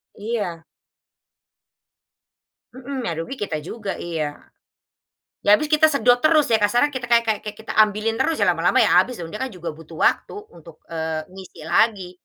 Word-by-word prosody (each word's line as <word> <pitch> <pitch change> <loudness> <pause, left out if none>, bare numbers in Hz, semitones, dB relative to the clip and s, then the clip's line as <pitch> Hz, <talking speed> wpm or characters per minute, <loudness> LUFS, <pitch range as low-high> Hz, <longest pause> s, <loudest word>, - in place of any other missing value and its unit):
Iya. 205 -7 -4 2.1
Mhm, 260 0 -6
yang 170 - -2
rugi 215 +11 -6
kita 160 -6 -3
juga 200 +4 -5
iya. 155 -4 -4 1.1
Ya 205 - +7
habis 300 +8 0
kita 310 0 +5
sedot 245 -5 +3
terus 310 0 +3
ya 225 - +4
kasarnya 240 +8 +2
kita 260 -3 -5
kayak 235 0 +3
kayak 215 -2 +1
kayak 210 0 -6
kita - - -6
ambilin 215 +1 +3
terus 325 - +1
ya - - +4
lama-lama - - +2
ya - - +3
habis 250 - +2
dia 165 +6 -7
kan 265 +2 -3
juga 175 -3 -6
butuh 160 +1 -12
waktu - - 0 0.2
untuk, 165 -1 -16
eee, 160 -1 -3
ngisi 190 -2 -12
lagi, 190 +2 +1
210 Hz, 165 wpm, -22 LUFS, 170-245 Hz, 2.1 s, Ya